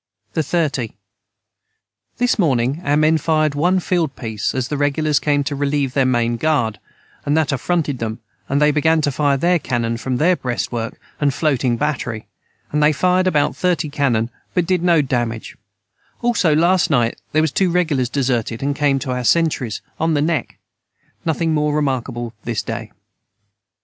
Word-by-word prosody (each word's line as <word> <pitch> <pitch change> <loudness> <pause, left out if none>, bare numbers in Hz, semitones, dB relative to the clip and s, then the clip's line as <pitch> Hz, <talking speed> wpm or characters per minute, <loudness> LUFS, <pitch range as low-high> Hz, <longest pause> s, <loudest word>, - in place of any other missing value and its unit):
the 160 - +1
30. 145 -7 -1 1.2
This 245 -2 +1
morning 135 -2 +1
our 145 +1 +2
men 155 +1 +3
fired 155 -1 +1
one 175 +6 +2
field 170 -5 -1
peice 110 -1 -3
as 130 -2 -1
the 150 - -3
regulars 145 +1 +1
came 145 -1 +1
to 140 +1 -3
relieve 140 -2 0
their 135 -2 +2
main 120 -2 +1
guard 120 -8 0 0.4
and 145 +2 +1
that 155 -3 +1
afronted 145 0 -1
them 110 -1 -3 0.3
and 140 - +1
they 150 0 +4
began 160 +2 +2
to 145 - +1
fire 140 0 +1
their 175 +4 +2
canon 115 -4 -1
from 125 +1 -2
their 175 +6 +3
brest 125 -7 -3
work 115 -2 -4 0.2
and 140 -2 +1
floating 130 -6 +1
Batry 125 -6 -2 0.5
and 150 - +1
they 150 +1 +5
fired 185 +4 +2
about 150 -5 +1
30 175 -4 0
canon 125 -5 0 0.2
but 180 - +2
did 180 0 +1
no 170 -4 +4
damage 120 -4 -2 0.7
also 205 -10 +2
last 175 +3 +3
night 120 -5 +1
their 155 +1 +3
was 160 - 0
too 185 +5 +2
regulars 155 -8 +1
deserted 125 -2 -1
and 140 0 0
came 145 -2 +2
to 130 -1 -3
our 125 0 -2
centrys 140 -6 +1 0.2
on 160 0 +1
the 145 - +2
neck 160 0 -1 0.7
nothing 165 0 0
more 150 -1 +1
remarkable 125 -5 -2
this 115 -2 -2
day. - - -5
145 Hz, 170 wpm, -19 LUFS, 125-160 Hz, 1.2 s, they